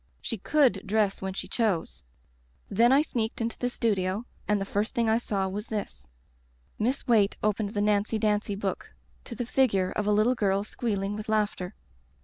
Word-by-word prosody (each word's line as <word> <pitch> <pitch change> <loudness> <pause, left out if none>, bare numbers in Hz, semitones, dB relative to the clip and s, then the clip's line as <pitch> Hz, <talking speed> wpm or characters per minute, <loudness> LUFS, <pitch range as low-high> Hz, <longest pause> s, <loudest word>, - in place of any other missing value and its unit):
She 230 - -4
could 255 -4 +3
dress 210 -1 +1
when 190 0 -3
she - - -4
chose. 195 - -1 0.7
"Then 235 +4 +4
I 280 +3 +5
sneaked 230 -7 -3
into 230 0 -3
the 245 - 0
studio 205 -3 0 0.2
and 210 -1 +2
the 195 - -2
first 205 +5 -2
thing 235 -2 +2
I 220 +1 +3
saw 195 -5 -1
was 205 +3 -5
this" 75 - -5 0.4
— 60 +1 -37
Miss 250 +6 0
Waite 215 -4 +3
opened 210 0 0
the 205 - +1
Nancy 210 +1 +2
Dancy 210 -1 0
book 195 -1 -4 0.3
to 235 - -7
the 245 - -3
figure 215 -8 +2
of 210 - -2
a - - +3
little 215 +4 +4
girl 200 -4 +1
squealing 205 -2 -2
with 215 +1 -6
laughter. 210 -3 0
210 Hz, 185 wpm, -28 LUFS, 195-230 Hz, 0.7 s, I